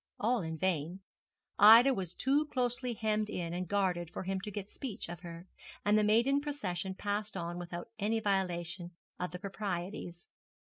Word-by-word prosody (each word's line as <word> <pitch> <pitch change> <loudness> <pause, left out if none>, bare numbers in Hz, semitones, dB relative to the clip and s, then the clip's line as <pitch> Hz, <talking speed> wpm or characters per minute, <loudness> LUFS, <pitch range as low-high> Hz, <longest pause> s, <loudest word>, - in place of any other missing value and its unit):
All 235 +2 +2
in 160 -1 -4
vain. 175 +1 -1 0.6
Ida 230 +6 +9
was 185 -6 -4
too 285 +3 +2
closely 250 -2 -1
hemmed 215 -1 0
in 170 -4 -3
and 180 +1 -3
guarded 180 -3 0
for - - -5
him 190 +1 -2
to 210 - -5
get 205 -1 -5
speech 235 -1 -5
of 175 -1 -7
her; 170 0 -9 0.4
and 205 +1 +4
the 215 - +4
maiden 235 +7 +4
procession 190 - -3
passed 205 +1 -2
on 175 0 -4
without 175 +4 -6
any 220 +2 +1
violation 180 -4 -1 0.3
of 180 - -2
the 180 - -6
proprieties. 180 -2 -5
195 Hz, 165 wpm, -33 LUFS, 175-215 Hz, 0.6 s, Ida